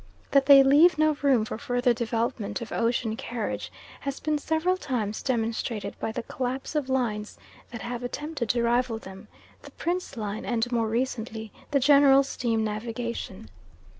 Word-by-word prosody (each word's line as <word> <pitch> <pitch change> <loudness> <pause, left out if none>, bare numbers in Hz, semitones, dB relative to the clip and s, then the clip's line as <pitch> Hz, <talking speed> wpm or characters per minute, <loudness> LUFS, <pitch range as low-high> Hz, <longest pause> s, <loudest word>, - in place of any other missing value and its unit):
That 275 -1 +4
they 275 -1 +9
leave 305 +5 +6
no 310 0 +3
room 265 -6 +3
for 220 - -5
further 245 +1 +1
development 230 -1 -2
of 235 - -7
ocean 230 -1 0
carriage 105 - -4 0.3
has 275 -1 -4
been 305 -1 -1
several 320 +5 +1
times 245 - -3
demonstrated 230 -3 -2
by - - -2
the 220 - -4
collapse 255 +4 -4
of 295 -4 -1
lines 220 -5 -1 0.3
that 235 - -7
have 240 0 -4
attempted 265 0 -4
to 240 +1 +2
rival 235 0 +1
them 190 -3 -11 0.3
the - - -12
Prince 350 -5 -3
line 210 -1 -4
and 240 0 -1
more 230 -2 +1
recently 225 -2 -3 0.2
the 280 - +2
General 275 0 +6
Steam 230 -4 -1
Navigation. 220 - -5
240 Hz, 160 wpm, -26 LUFS, 225-275 Hz, 0.3 s, they